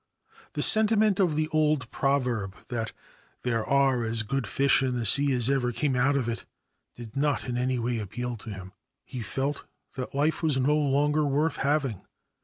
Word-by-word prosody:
The - - -1
sentiment 215 -2 +4
of 175 -6 +2
the 155 0 0
old 155 -3 +1
proverb 125 -8 0
that 115 -3 -3 0.3
' - - -33
there 115 -3 0
are 135 -2 +2
as 115 0 0
good 130 +1 -2
fish 140 +4 +3
in 130 -2 0
the 120 -2 -2
sea 140 +6 +3
as 125 -3 +1
ever 135 -3 +1
came 135 +2 0
out 135 +3 +2
of 125 -4 -1
it 115 -1 -3 0.3
' - - -52
did 115 -3 -10
not 145 0 0
in 125 - -2
any 125 +1 0
way 120 0 -1
appeal 120 +4 -4
to 110 - -10
him. 95 -2 -8 0.3
He 125 - -6
felt 135 +6 -3 0.3
that 130 0 -5
life 150 +3 +1
was 155 -5 +1
no 135 +3 +2
longer 150 +1 +2
worth 150 +4 +1
having. 140 -7 0
135 Hz, 195 wpm, -27 LUFS, 120-145 Hz, 0.3 s, sentiment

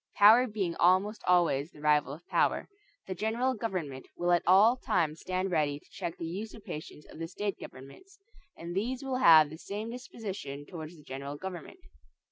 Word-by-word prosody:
Power 225 +5 +7
being 195 -6 -2
almost 190 +5 +3
always 170 -5 +3
the - - -17
rival 150 -2 +2
of 160 +5 -10
power, - - +1 0.4
the 190 - -4
general 225 +7 0
government 180 - -4
will 175 0 +1
at 175 - +4
all 205 +7 +6
times 165 -10 -1
stand 185 +1 -2
ready 150 -4 +1
to - - -19
check 170 - -5
the 165 - -5
usurpations 185 -4 -7
of - - -13
the 165 - -3
state 200 +3 -4
governments, 140 - -12 0.4
and 170 +1 -7
these 245 +7 -2
will 265 -1 -2
have 160 - +7
the 160 - -9
same 210 +4 -5
disposition 200 - -7
towards 165 0 -9
the 150 - -16
general 140 +1 -6
government. 180 -1 -8
180 Hz, 175 wpm, -30 LUFS, 155-215 Hz, 0.4 s, Power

